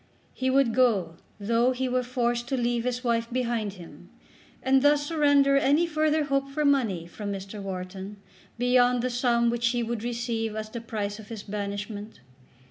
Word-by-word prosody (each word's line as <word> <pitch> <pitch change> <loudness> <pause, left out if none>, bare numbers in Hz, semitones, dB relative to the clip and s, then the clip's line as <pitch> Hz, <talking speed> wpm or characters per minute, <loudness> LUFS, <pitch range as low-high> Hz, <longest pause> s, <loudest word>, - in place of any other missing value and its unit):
He 260 0 -1
would 260 -3 +3
go 205 -10 +2 0.2
though 235 +5 +2
he 260 +1 -2
were 255 0 +1
forced 240 -1 -1
to 265 - -1
leave 240 -1 0
his 250 0 -2
wife 230 -1 0
behind 235 -5 -1
him, 175 -4 -13 0.5
and 265 0 +4
thus 290 +1 +4
surrender 285 -3 +4
any 285 +5 +3
further 310 -1 +1
hope 275 -1 -1
for 300 +2 -1
money 230 -12 +2
from 200 +4 -6
Mr. 195 +1 -6
Wharton 190 +1 -6 0.4
beyond 245 0 +3
the 255 - 0
sum 235 -1 +2
which 235 0 0
he 240 0 0
would 230 -1 -3
receive 230 -2 -2
as 215 0 -5
the 235 - -5
price 210 -2 -4
of 215 - -11
his 220 -3 -7
banishment. 205 +1 -5
235 Hz, 175 wpm, -27 LUFS, 210-260 Hz, 0.5 s, and